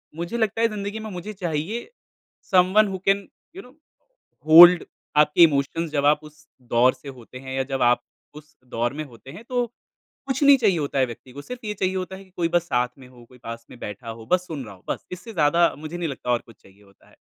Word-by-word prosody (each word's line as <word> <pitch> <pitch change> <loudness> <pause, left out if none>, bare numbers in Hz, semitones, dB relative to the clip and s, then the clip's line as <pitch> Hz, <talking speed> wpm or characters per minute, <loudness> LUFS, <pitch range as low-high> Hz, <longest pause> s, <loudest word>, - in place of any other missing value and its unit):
मुझे 170 +8 -4
लगता 220 -1 0
है 230 - +4
ज़िंदगी 210 0 -5
में 220 0 -7
मुझे 185 +3 -7
चाहिए, 185 - -4 0.6
someone 190 +3 +5
who 190 -1 -4
can 195 0 +2 0.3
you 385 - -7
know 250 - -17 0.8
hold 175 +2 +9 0.3
आपके 150 +3 +6
इमोशंस 155 +2 +1
जब 145 -2 0
आप 150 +1 +4
उस 150 0 -16 0.3
दौर 125 +2 +5
से 135 +2 -12
होते 125 +1 -13
हैं 130 0 -8
या 135 - 0
जब 135 -1 -2
आप 120 0 +3 0.3
उस 150 0 -14 0.2
दौर 120 +2 -1
में 155 +2 -4
होते 120 -1 -14
हैं 210 - -11
तो 245 -1 0 0.6
कुछ 270 - -2
नहीं 280 -1 +7
चाहिए 210 -8 +2
होता 140 -2 -2
है 130 - +4
व्यक्ति 125 +1 -11
को। 140 - -8
सिर्फ़ 245 +8 -9
ये 210 - -2
चाहिए 190 -2 -1
होता 185 0 -4
है 190 - -11
कि - - -24
कोई 170 - +1
बस 175 0 +2
साथ 125 -7 0
में 130 - -13
हो, 125 -1 -17
कोई 125 +2 -19
पास 115 -1 -9
में - - -13
बैठा 105 +2 -7
हो, 115 0 -9
बस 180 +9 +1
सुन 150 -5 -5
रहा 105 - -10
हो 90 - -23
बस, - - -4
इससे 195 +6 -8
ज़्यादा 170 0 +3
मुझे 155 +3 -7
नहीं 170 -2 -2
लगता 130 -2 -4
और 120 - +2
कुछ 115 - -17
चाहिए 100 +1 -21
होता 100 -1 -24
है, - - -23
155 Hz, 240 wpm, -23 LUFS, 130-190 Hz, 0.8 s, hold